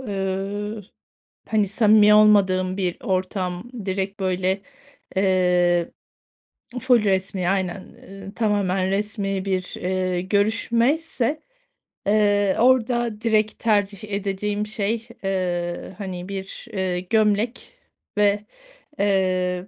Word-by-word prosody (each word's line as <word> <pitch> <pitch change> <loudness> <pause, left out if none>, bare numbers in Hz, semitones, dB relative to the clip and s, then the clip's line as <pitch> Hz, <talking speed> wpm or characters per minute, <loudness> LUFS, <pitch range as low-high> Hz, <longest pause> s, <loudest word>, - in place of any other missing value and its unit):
ııı, 205 0 -3 0.7
hani, 215 -2 +1
samimi 210 0 +5
olmadığım 190 -3 +4
bir 180 -3 -1
ortam, 185 0 -2 0.2
direkt, 195 +1 -3
böyle, 190 +1 0 0.5
eee 180 -2 +2 0.9
Ful 245 -2 +4
resmî, 190 -2 0
aynen, 190 -1 -1 0.3
ııı, 195 0 -10
tamamen 195 -4 +1
resmî 195 -1 -2
bir, 185 -2 -2
eee, 185 -1 -1
görüşmeyse, 230 - 0 0.7
eee, 205 -1 +3
orada 240 -2 +2
direkt 220 -1 +1
tercih 205 -2 0
edeceğim 205 +1 -2
şey, 215 +2 -2 0.2
eee, 180 -2 -2
hani, 185 -2 -6
bir, 195 0 -7
eee, 185 -2 -1
gömlek 215 +4 0 0.5
ve, 205 0 +2 0.5
eee, 185 -2 +1
195 Hz, 95 wpm, -23 LUFS, 185-210 Hz, 0.9 s, samimi